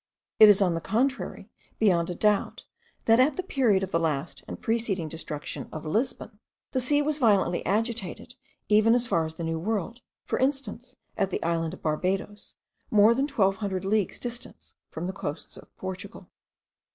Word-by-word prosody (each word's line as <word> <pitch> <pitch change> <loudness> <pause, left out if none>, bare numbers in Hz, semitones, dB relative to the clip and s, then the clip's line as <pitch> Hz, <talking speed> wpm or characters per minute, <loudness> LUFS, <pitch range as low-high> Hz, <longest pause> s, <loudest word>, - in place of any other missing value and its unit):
It 215 -1 +10
is 205 -1 +6
on 180 -3 +1
the 165 - -3
contrary 255 +9 -1 0.3
beyond 180 -6 +2
a 175 - -3
doubt, 210 +1 +1 0.4
that 225 +1 +5
at 265 +2 +3
the 370 - -2
period 240 - +2
of 190 - -4
the 165 - +2
last 155 -4 -2
and - - -7
preceding 220 -7 -1
destruction 155 -1 -6
of 155 0 -7
Lisbon,* 225 - -2 0.3
the 260 - 0
sea 290 +4 +2
was 305 0 -1
violently 205 -7 +3
agitated 225 +1 -2 0.3
even 215 +2 +5
as 245 0 +2
far 165 -8 +1
as 160 - -9
the 170 - -6
New 165 0 -2
World, 220 +5 -3 0.2
for - - -2
instance, 260 -2 -2 0.2
at 195 -2 +1
the - - -3
island 165 0 -1
of - - -21
Barbados, 190 +6 -2 0.3
more 215 +1 +6
than 270 +4 0
twelve 195 -9 +2
hundred 190 -3 -3
leagues 205 -1 0
distant 240 0 -6 0.2
from 160 - -5
the 190 - -3
coasts 150 -3 -6
of - - -13
Portugal. 190 +3 -7
205 Hz, 175 wpm, -27 LUFS, 175-235 Hz, 0.4 s, It